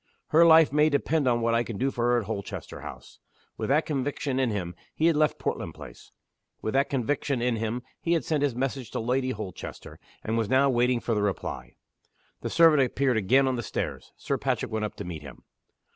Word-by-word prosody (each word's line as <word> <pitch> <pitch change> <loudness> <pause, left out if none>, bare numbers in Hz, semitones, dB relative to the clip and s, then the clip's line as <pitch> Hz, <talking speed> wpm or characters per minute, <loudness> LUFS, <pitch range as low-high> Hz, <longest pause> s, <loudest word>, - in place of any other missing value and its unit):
"Her 160 +2 +6
life 160 -3 +6
may 150 +1 +4
depend 145 0 +1
on 120 -1 +2
what 115 0 +1
I 115 - +3
can 115 -3 -6
do 135 +4 0
for 120 -2 -1
her 120 0 +3
at 115 - -2
Holchester 100 -1 -6
House!" - - -10 0.4
With - - -4
that 150 +3 +3
conviction 140 -1 -2
in 130 -2 +2
him, 95 -5 -3 0.2
he 160 - +1
had 165 -1 +4
left 155 0 +2
Portland 80 - -3
Place. 70 -6 -12 0.5
With 110 - -3
that 135 +1 +2
conviction 135 +1 -1
in 120 -1 0
him, 115 +2 -3 0.2
he 170 - +1
had 165 - 0
sent 155 -3 0
his 140 -4 +1
message 130 -1 -3
to - - -1
Lady 130 +3 0
Holchester, 105 -6 -7 0.2
and 115 +1 -1
was 110 - -1
now 135 +1 +4
waiting 120 0 +2
for 115 - -1
the 105 - 0
reply. 100 -2 -3 0.7
The - - -3
servant 160 -4 +5
appeared 130 0 +1
again 130 +7 +3
on 130 -1 0
the - - -2
stairs. - - -4
Sir - - -2
Patrick - - -1
went 110 -1 -1
up 105 - -6
to - - -6
meet 85 -4 -6
him. 70 - -12
125 Hz, 220 wpm, -27 LUFS, 110-140 Hz, 0.7 s, Her